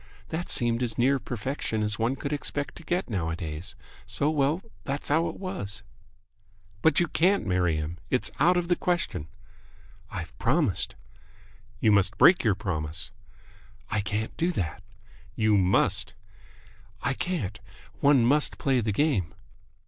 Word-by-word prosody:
That 165 +2 -3
seemed 120 0 +1
as 120 -3 -1
near 135 +3 +3
perfection 120 -2 -3
as 105 -1 -1
one 115 +4 +1
could 140 +1 -4
expect 145 0 -2
to 170 - -11
get 175 +4 -1
nowadays, 80 -2 -3 0.3
so 145 +2 0
well, 150 +4 +1 0.2
that's 140 +1 -3
how 160 +3 +3
it - - -8
was." 105 - -4 1.0
"But 160 - +4
you 175 - +2
can't 190 +6 +2
marry 90 -4 +2
him! 80 +2 -4
It's 125 - 0
out 175 +5 +5
of 175 -1 0
the 175 - +3
question!" 170 - -1 0.8
"I've 85 0 -6
promised." 135 - +1 0.8
"You 110 - +4
must 100 -1 +3
break 180 - +7
your 105 -5 +3
promise." 80 -6 -4 0.8
"I 110 - +1
can't 105 +3 -3
do 170 +2 +1
that." 85 - -3 0.5
"You 110 -1 +3
must!" 95 -1 +2 0.9
"I 125 - +1
can't. 130 - -3 0.4
One 140 -4 +5
must 145 +4 +2
play 130 -3 +2
the 110 -1 0
game." 100 - +1
120 Hz, 145 wpm, -27 LUFS, 95-150 Hz, 1.0 s, break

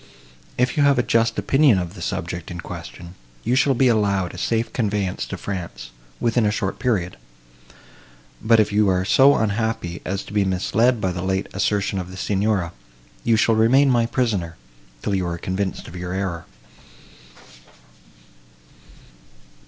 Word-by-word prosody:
If 125 +3 +1
you - - +3
have 140 -2 +4
a 120 - +3
just 115 -1 +1
opinion 135 -6 +4
of 90 -1 -3
the 95 - -11
subject 90 -1 -4
in 85 -1 -7
question, 85 0 -9 0.3
you 120 - 0
shall 135 +1 +3
be 130 +2 +3
allowed 100 -5 +1
a - - -9
safe 115 0 -1
conveyance 100 -5 -1
to - - -5
France, 85 -11 -6 0.3
within 115 0 +1
a 105 - +3
short 100 -2 -3
period; 100 -9 -1 1.2
but, 115 0 +4
if 105 -1 +2
you 105 -1 +3
are 95 0 +1
so 140 +7 +5
unhappy 110 -4 -1
as 95 +1 -3
to - - -12
be 105 -1 +3
misled 110 +6 +1
by 95 - 0
the 90 0 -4
late 95 +1 -1
assertion 100 0 0
of 90 0 -6
the 95 - -10
Signora, 100 -3 0 0.5
you 115 -1 +3
shall 115 +1 +3
remain 130 +5 +4
my 120 -2 +2
prisoner, 105 -9 -1 0.5
till 100 - -1
you 95 -2 0
are 85 0 -3
convinced 95 +2 -3
of 85 - -11
your 90 0 -5
error." 95 -4 -3
100 Hz, 160 wpm, -22 LUFS, 90-115 Hz, 1.2 s, so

